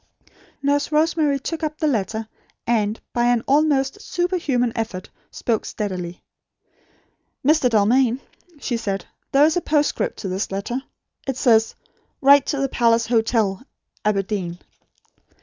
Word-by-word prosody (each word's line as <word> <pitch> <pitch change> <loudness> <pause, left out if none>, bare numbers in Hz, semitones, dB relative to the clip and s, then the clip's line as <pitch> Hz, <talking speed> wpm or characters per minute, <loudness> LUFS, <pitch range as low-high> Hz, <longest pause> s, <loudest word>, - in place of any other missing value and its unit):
Nurse 285 +1 +1
Rosemary 305 -2 +2
took 325 +5 -4
up 305 0 -2
the 310 - -1
letter; 220 - -1 0.4
and, 220 -2 0
by 240 0 +2
an 240 -1 +2
almost 285 +3 +2
superhuman 325 - 0
effort, 195 -5 -4 0.2
spoke 225 -3 -1
steadily. 180 -4 -5 1.2
"Mr. 300 -3 +4
Dalmain," 235 +3 +3 0.4
she 245 -4 -2
said; 200 -4 -3 0.3
"there 280 +2 +6
is 320 - +2
a - - +1
postscript 305 +11 0
to 200 - -5
this 190 +2 -2
letter. 205 +7 -3 0.5
It 265 -2 -2
says: 225 -4 +3 0.4
'Write 280 0 +6
to 285 - -1
The 275 0 +1
Palace 230 -2 +3
Hotel, 220 -4 +1 0.4
Aberdeen.'" 195 -4 -1
240 Hz, 130 wpm, -22 LUFS, 215-285 Hz, 1.2 s, there